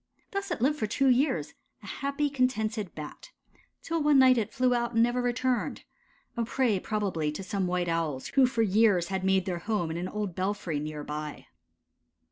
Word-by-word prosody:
Thus 395 0 -3
it 345 - -3
lived 295 +3 +2
for 215 - 0
two 270 +5 +2
years, 245 - +1 0.3
a - - -11
happy, 280 +7 -2
contented 225 -7 -1
Bat, 150 -1 -8 0.5
till 330 -1 -1
one 295 -1 +4
night 260 -2 +6
it 210 - -3
flew 255 -2 +2
out 235 -1 -1
and 230 - +5
never 240 +1 +1
returned 245 +1 -1 0.5
a 235 - 0
prey 230 -4 +1
probably 185 -8 -1
to 170 +6 -6
some 190 0 -1
White 180 0 0
Owls 165 -5 -2
who 270 -2 +4
for 240 -3 +1
years 200 -4 +3
had 190 -1 -2
made 190 -1 +2
their 180 -3 -2
home 175 -3 -1
in 165 - -3
an 180 +1 -3
old 205 -2 -3
belfry 185 -4 -2
near 150 0 -5
by. 150 0 -6
210 Hz, 190 wpm, -28 LUFS, 175-255 Hz, 0.5 s, night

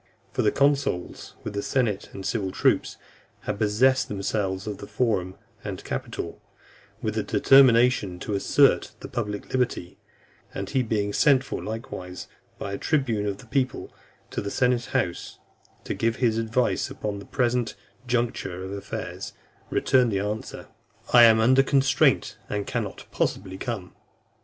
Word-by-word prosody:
For - - 0
the - - +3
consuls, 140 -9 0
with - - -5
the 100 - -2
senate 110 -4 -1
and 95 -1 -8
civic 100 -2 -2
troops, - - +2 0.4
had 105 -1 -4
possessed 130 +6 +3
themselves 95 -1 -2
of 105 -2 -5
the 100 - -8
Forum 95 -7 0 0.3
and - - -5
Capitol, - - -5 0.6
with - - -1
the - - 0
determination 125 -7 +5
to 105 - -3
assert 100 - +3
the - - -6
public 105 -3 -4
liberty; 125 -9 -1 0.6
and 100 - -3
he 135 - +2
being 105 -3 -1
sent 135 0 +4
for - - -5
likewise, 90 -5 -6 0.3
by 100 - -5
a 100 - -4
tribune 120 -9 0
of 100 -1 -2
the 120 - -14
people, 130 +2 -2 0.4
to - - -2
the 100 - -4
senate 125 0 +1
house, 85 -1 -2 0.5
to - - -3
give 115 0 0
his 115 -3 +1
advice 115 +2 0
upon 105 -1 -4
the 100 - -10
present 120 -2 0 0.3
juncture 115 -7 -1
of 95 - -6
affairs, 100 0 -6 0.4
returned 125 -5 +3
answer, 105 +2 -3 0.5
"I 120 -1 +10
am 110 -1 +6
under 130 +4 +5
constraint, 135 -1 +2
and 105 -1 -2
cannot - - -4
possibly 95 -1 -2
come." 105 -7 -5
110 Hz, 150 wpm, -25 LUFS, 100-125 Hz, 0.6 s, I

